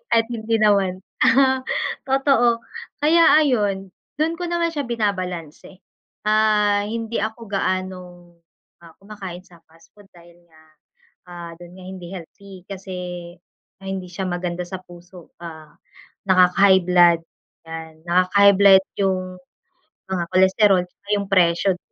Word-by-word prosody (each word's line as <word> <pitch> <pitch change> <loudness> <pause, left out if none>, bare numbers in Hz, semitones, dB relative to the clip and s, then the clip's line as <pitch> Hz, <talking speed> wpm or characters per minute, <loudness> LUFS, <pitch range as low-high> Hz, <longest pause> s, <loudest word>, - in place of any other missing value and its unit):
At 230 0 +4
hindi 225 -1 -1
naman, 195 -3 +2 0.2
aha, 265 -1 +3 0.4
totoo, 265 -4 +2 0.4
kaya 320 +3 +4 0.2
ayun, 205 -9 0 0.3
dun 325 +2 0
ko 355 - -5
naman 345 -1 0
siya 290 -2 -2
binabalanse. 185 -6 -4 0.4
Ah, 210 -1 +2
hindi 230 +1 -4
ako 220 +1 -5
gaanong, 185 -3 -4 0.5
ah, 165 - -14
kumakain 195 -3 -9
sa 170 -2 -20
fast 165 +1 -23
food 205 -1 -18
dahil 170 -1 -18
nga, 160 -1 -22 0.7
ah, 175 -1 -9
dun 175 0 -13
nga 185 - -13
hindi 185 -1 -9
healthy 190 +2 -12
kasi, 190 -1 -8 0.9
ah, 195 - -8
hindi 190 -1 -5
siya 180 +2 -6
maganda 175 0 -3
sa 180 +1 -7
puso, 175 0 -15
ah, 160 -2 -11 0.5
nakaka-high 190 +1 +5
blood, 175 -2 +5 0.5
yan, 160 0 -7 0.2
nakaka-high 190 +3 +4
blood 195 -1 +6 0.2
yung 190 -1 +1 0.9
mga 190 -2 -2
cholesterol, 190 0 +4
tsaka 180 +3 -29
yung 200 - -4
presyo. 180 0 +2
190 Hz, 130 wpm, -21 LUFS, 175-215 Hz, 0.9 s, blood